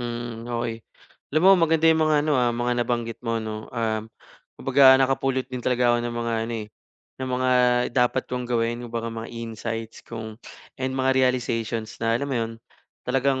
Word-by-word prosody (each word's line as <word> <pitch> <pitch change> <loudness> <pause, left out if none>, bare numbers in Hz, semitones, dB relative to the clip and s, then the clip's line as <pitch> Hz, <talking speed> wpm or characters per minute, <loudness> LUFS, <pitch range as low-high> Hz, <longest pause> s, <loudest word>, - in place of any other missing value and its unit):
Mm, 120 -1 -5
okey. 115 -1 -3 0.5
Alam 155 - +3
mo 195 - +9 0.2
maganda 160 0 +2
'yong 160 0 +5
mga 155 -1 +3
ano, 155 - +1
ah, 120 - +3
mga 120 +1 0
nabanggit 120 -1 -2
mo 115 -1 -1
'no, 110 -1 -5
um, 110 -2 -2 0.5
kumbaga 135 0 +6
nakapulot 135 0 +1
din 125 - -3
talaga 125 -1 +2
ako 120 - +3
ng 120 0 -4
mga 115 0 -2 0.2
ano - - -4
eh, 105 - -16 0.5
ng 130 - -3
mga 130 0 0 0.4
dapat 125 +1 +2
kong 125 -1 -4
gawin 120 0 0
kumbaga 115 0 -4
mga 115 0 -6
insights 115 -1 -6
kung 110 -1 -8 0.4
and 130 0 -1
mga 130 0 +2
realizations 120 -4 -1
na 115 0 +2
alam 140 - -3
mo 135 - -2
'yon, 115 0 -3 0.5
talagang 135 +1 +1
120 Hz, 180 wpm, -24 LUFS, 115-130 Hz, 0.5 s, mo